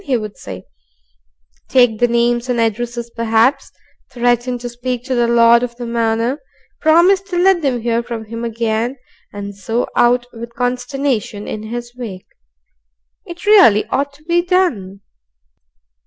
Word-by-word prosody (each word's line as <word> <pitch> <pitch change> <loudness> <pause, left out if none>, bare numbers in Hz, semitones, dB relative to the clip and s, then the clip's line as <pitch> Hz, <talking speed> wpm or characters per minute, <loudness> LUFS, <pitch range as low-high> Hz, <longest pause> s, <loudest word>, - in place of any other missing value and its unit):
he 265 -4 +1
would 215 -2 -6
say; 95 0 -9 1.0
take 245 -4 +3
the 245 - +4
names 240 +1 +1
and 245 -1 0
addresses 235 +1 -2
perhaps, 230 +4 +1 0.4
threaten 245 0 0
to 245 0 -6
speak 245 0 -4
to 265 0 -3
the 240 -1 +2
Lord 235 0 +5
of 245 -1 -4
the 240 0 -7
Manor, 230 +3 -1 0.4
promise 345 +5 +4
to 390 -2 -5
let 365 0 +4
them 260 -5 -1
hear 235 0 0
from 235 -2 -6
him 230 +2 -7
again, 230 +2 -2 0.3
and 200 0 -7
so 225 +5 -2
out 245 0 +3
with 235 0 -9
consternation 245 -3 -2
in 215 - -5
his 240 +1 -6
wake. 215 -7 -8 1.0
It 345 0 -9
really 380 - +6
ought 280 +1 -1
to 295 +2 -21
be 345 +2 +2
done. 290 - 0
240 Hz, 150 wpm, -17 LUFS, 230-260 Hz, 1.0 s, really